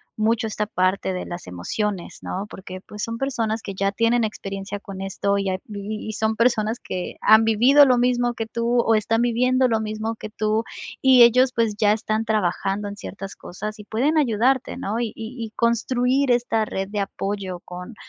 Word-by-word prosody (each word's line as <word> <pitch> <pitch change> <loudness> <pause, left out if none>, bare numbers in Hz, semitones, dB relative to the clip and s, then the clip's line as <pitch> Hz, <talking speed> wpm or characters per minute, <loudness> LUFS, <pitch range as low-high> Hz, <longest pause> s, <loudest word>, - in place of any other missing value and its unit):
mucho 225 +2 +1
esta 210 -1 -2
parte 185 0 0
de 180 -1 -4
las 175 0 -7
emociones, 175 - -3
¿no?, 190 +2 -4
porque 185 0 -9
pues 210 - -8
son 230 0 -3
personas 230 -4 -1
que 195 - -5
ya 195 +1 0
tienen 230 +3 +2
experiencia 195 -1 -4
con 195 -1 -8
esto 200 +1 -1
y 195 -1 -1
ap 185 0 -2
y 210 +1 -6
y 220 - -4
son 220 +1 0
personas 230 -1 +1
que 180 -1 -5
han 220 +1 +7
vivido 250 +7 +6
lo 250 -1 +4
mismo 245 -1 +1
que 225 - -3
tú 235 +2 -1
o 225 - +2
están 225 +2 +2
viviendo 255 +2 +3
lo 225 -2 +1
mismo 215 +1 -3
que 215 - -8
tú, 215 +1 0 0.4
y 260 -2 +7
ellos, 250 +2 +5
pues 230 -3 +1
ya 210 -1 +4
están 220 0 -1
trabajando 205 -1 0
en 200 - -6
ciertas 195 -2 -8
cosas 210 +4 -7
y - - -8
pueden 275 +10 +1
ayudarte, 255 0 +1
¿no?, 215 +4 -2
y 240 - 0
y 230 +2 -6
y - - -13
construir 250 +3 +1
esta 240 -2 +2
red 195 -2 -4
de 205 0 -3
apoyo 195 -2 -3
con 180 +5 -9
220 Hz, 195 wpm, -23 LUFS, 200-235 Hz, 0.4 s, han